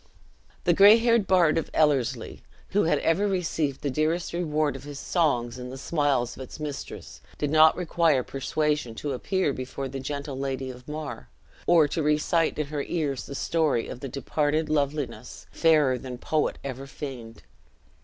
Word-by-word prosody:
The 175 - +4
gray 200 +5 +8
haired 230 -3 +2
bard 170 -4 +4
of - - -5
Ellerslie, 130 -6 +1 0.3
who 205 -1 +2
had 165 - +3
ever 190 +6 +2
received 160 -7 -1
the 140 - -1
dearest 160 +6 0
reward 155 -3 0
of - - -8
his 145 -1 -8
songs 130 -7 0
in 125 0 -6
the 130 - -7
smiles 140 -5 0
of - - -10
its 130 - -9
mistress, 150 -2 -7 0.2
did 145 -1 -1
not 155 0 +6
require 165 -6 +2
persuasion 145 -2 -1
to 145 - -4
appear 165 +4 0
before 130 +1 -5
the 135 +1 -6
gentle 140 0 -5
lady 135 -1 -3
of 125 0 -14
Mar, 150 -1 -6 0.4
or 165 -3 +6
to 165 - -1
recite 150 +2 +1
in 150 - -1
her 145 0 -3
ears 145 -4 -2
the 140 - -7
story 155 -6 0
of 125 - -7
the 135 - -6
departed 150 +3 -1
loveliness, 145 -2 -2
fairer 150 -6 +3
than 125 -2 -7
poet 155 +5 -1
ever 135 0 -6
feigned. 125 -6 -8
150 Hz, 170 wpm, -26 LUFS, 135-160 Hz, 0.4 s, gray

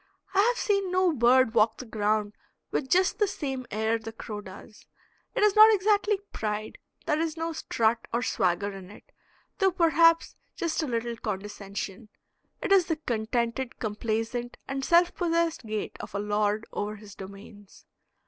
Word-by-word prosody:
I 390 - +2
have 475 +4 +4
seen 395 -4 +1
no 365 -2 +3
bird 250 -2 +4
walk 220 -1 +3
the 255 - -8
ground 210 -1 0 0.4
with 265 - -2
just 370 +4 +3
the 415 - +3
same 270 -9 -4
air 220 +2 0
the 225 0 -7
crow 215 -2 -7
does. 200 +2 -13 0.5
It - - +2
is 420 -1 +4
not 435 +1 +9
exactly 415 0 +2 0.2
pride; 215 0 -4 0.3
there 300 - +1
is 325 0 -2
no 330 0 -2
strut 230 -6 0
or 235 +1 0
swagger 195 +1 0
in 190 -2 -10
it, 205 - -15 0.5
though 385 -1 +4
perhaps 330 -1 +4 0.2
just 335 -1 -1
a 310 - -2
little 235 -1 -2
condescension; 205 0 -5 0.5
it - - -2
is 380 -3 +5
the 325 - 0
contented, 235 -1 -2
complaisant, 225 +2 -3
and 270 0 -3
self 345 +4 +4
possessed 335 -6 0
gait 215 -1 -4
of - - -8
a - - 0
lord 210 +1 0
over 210 +1 -3
his 205 -1 -12
domains. 200 +1 -12
235 Hz, 165 wpm, -27 LUFS, 210-330 Hz, 0.5 s, not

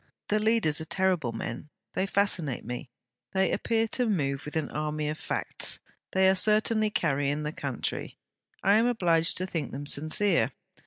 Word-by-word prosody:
The 215 - +2
leaders 215 -9 +3
are - - -3
terrible 180 -8 +1
men; 115 +5 -6 0.2
they 190 - 0
fascinate 185 -10 +1
me. 125 +2 -5 0.4
They 190 0 +2
appear 225 -1 +1
to 250 +1 0
move 140 -9 -1
with 150 - -7
an 155 -3 -1
army 150 0 -2
of 155 - -4
facts. - - -1 0.4
They 190 0 +4
are 190 - +6
certainly 215 +2 +3
carrying 145 -5 0
the 150 - -2
country. 140 -5 -4 0.5
I 200 +2 +5
am 230 +2 +3
obliged 170 -9 +2
to 185 - -1
think 165 -7 -4
them 140 +2 -6
sincere. 155 +8 +2
170 Hz, 165 wpm, -28 LUFS, 150-205 Hz, 0.5 s, are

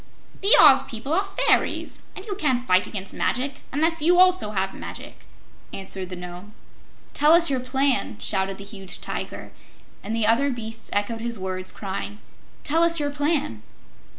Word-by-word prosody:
"The 400 +3 +6
Oz 285 -4 +8
people 245 +5 -5
are 385 +4 +2
fairies, 390 0 0
and 380 - -9
you 415 - -4
can't 260 -10 0
fight 185 -4 +3
against 195 -2 -7
magic 270 +2 -2
unless 320 +3 +1
you 350 +3 +4
also 365 -10 +4
have 195 -2 -2
magic," - - -10 0.5
answered 190 -1 -5
the 185 - -6
Nome. 180 +4 -10 0.6
"Tell 300 +2 +4
us 340 -3 +5
your 265 - 0
plan!" 265 -2 0
shouted 190 -1 -1
the 200 - -9
huge 195 -2 -8
Tiger, - - -6 0.5
and 215 +3 -4
the 225 -2 +1
other 230 +6 +3
beasts 225 -3 -6
echoed 215 +3 -1
his 235 -1 -3
words, 185 -1 -1
crying: 200 +1 -5 0.5
"Tell 320 +3 +2
us 335 0 +4
your 290 -1 -1
plan." 290 - -1
245 Hz, 165 wpm, -24 LUFS, 195-300 Hz, 0.6 s, Oz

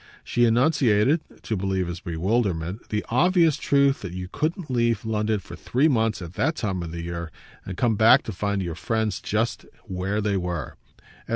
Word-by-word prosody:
She 120 - +2
enunciated, 125 +2 +3 0.2
to 110 - -2
relieve 95 -1 -1
his 85 0 -5
bewilderment, 90 +1 -1
the 105 -1 -2
obvious 165 +4 +4
truth 140 -2 +2
that 90 -3 -6
you 90 0 -5
couldn't 155 - -3
leave 115 -3 +1
London 110 -1 0
for 85 -2 -10
three 130 - +1
months 110 -8 +1
at 85 0 -8
that 160 - 0
time 95 - -2
of 85 - -5
the 85 0 -5
year 85 -1 -5 0.4
and 95 -1 -5
come 120 -3 +2
back 115 +6 +6
to - - -5
find 100 0 -2
your 85 -2 -3
friends 110 +3 -2
just - - -1 0.2
where 95 +3 -2
they 105 -2 0
were. 90 -5 -4
105 Hz, 180 wpm, -24 LUFS, 90-120 Hz, 0.4 s, back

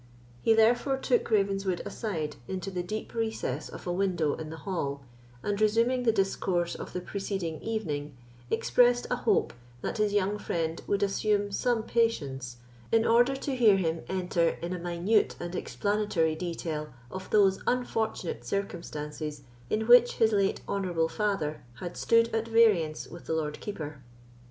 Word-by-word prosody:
He 225 - +4
therefore 240 +5 +3
took 255 -2 +1
Ravenswood 195 -3 +1
aside 155 - -3
into 190 +1 -4
the 180 -1 -2
deep 215 +5 -5
recess 220 - -2
of - - -10
a 175 - -1
window 175 -5 +1
in 155 -1 -6
the 160 - -7
hall, 140 -8 -2 0.4
and 205 0 -1
resuming 230 +4 +3
the 225 - +5
discourse 190 -4 0
of - - -7
the 180 - -3
proceeding 190 -4 -4
evening, 150 - -3 0.3
expressed 245 0 +3
a - - +3
hope 220 -4 +1 0.3
that - - -3
his 210 -1 +2
young 205 0 +1
friend 165 -3 -2
would 200 0 +1
assume 205 0 +1
some 235 +2 +1
patience, 140 - -1 0.3
in 225 0 +4
order 245 +4 +4
to 270 0 -3
hear 220 -6 +6
him 165 -3 -1
enter 180 -3 +1
in 175 +1 -2
a 180 - -4
minute 175 +5 +1
and 175 0 -5
explanatory 205 -7 0
detail 155 -3 -4 0.2
of 190 0 -7
those 195 -2 +4
unfortunate 225 - -1
circumstances 150 -3 -4 0.3
in 220 +1 0
which 245 +1 +7
his 225 -1 +3
late 200 -2 +1
honourable 175 -5 0
father 195 -8 -1
had 175 +6 -6
stood 230 0 +4
at 225 0 0
variance 210 -9 +3
with 170 - -11
the - - 0
Lord 150 -2 -2
Keeper. 155 -8 -6
195 Hz, 155 wpm, -29 LUFS, 165-220 Hz, 0.4 s, which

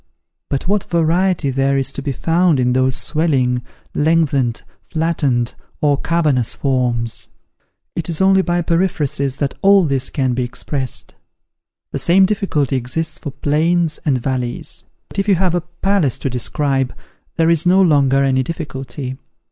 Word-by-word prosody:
But 140 +4 -2
what 205 0 +1
variety 170 -2 +1
there 135 +1 +1
is 135 - -1
to - - -4
be 140 - -2
found 165 +2 +2
in 125 0 +2
those 130 0 +2
swelling, 135 -6 +1 0.3
lengthened, 145 -6 +1 0.3
flattened, 145 -7 0 0.3
or 145 -2 +2
cavernous 150 -8 +1
forms! 120 -4 -1 0.7
It 170 0 -3
is 165 - -2
only 190 0 +5
by 175 -1 0
periphrasis 155 -6 0
that 140 -2 -1
all 195 -2 +5
this 135 -3 -1
can 130 -3 0
be 125 - -1
expressed. 130 +1 -3 0.8
The - - -2
same 190 +3 +5
difficulty 185 - 0
exists 130 +6 -3
for - - -5
plains 155 +4 +1
and 140 -4 +2
valleys. 125 -1 -3 0.2
But - - -6
if 195 - 0
you 200 - +5
have 180 -1 +1
a 175 - +1
palace 175 - 0
to 135 - -3
describe, 135 +2 -1 0.4
there 165 0 +3
is 170 +1 +2
no 185 +2 +5
longer 140 -6 +4
any 130 -1 +2
difficulty. 135 -3 -5
145 Hz, 150 wpm, -18 LUFS, 130-170 Hz, 0.8 s, only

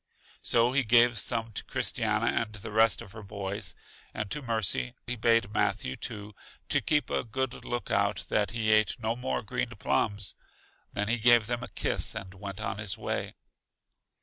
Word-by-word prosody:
So 120 +1 +4
he 135 +1 +2
gave 120 0 +5
some 115 -1 0
to - - -3
Christiana - - 0 0.2
and 110 -2 -5
the 105 0 -7
rest 110 -3 +4
of 95 - -13
her 110 - -9
boys, 100 -3 -5 0.4
and 105 -2 -3
to 150 - -1
Mercy; 115 0 0
he 125 - -2
bade 115 -2 +2
Matthew, 65 - 0
too, 105 0 -6 0.4
keep 150 -1 +2
a - - +1
good 130 +2 -3
look 120 0 -3
out 100 0 +1
that 105 -2 +2
he 110 -1 0
ate 110 +3 +3
no 115 0 -1
more 65 - -2
green - - -2
plums; 100 -2 0 0.6
then 105 0 -2
he 115 +2 +1
gave 120 -1 +6
them 120 +1 -2
a - - -5
kiss, - - +1
and 95 -1 -6
went 100 0 -7 0.2
his 105 -3 -1
way. - - -3
110 Hz, 175 wpm, -29 LUFS, 100-120 Hz, 0.6 s, gave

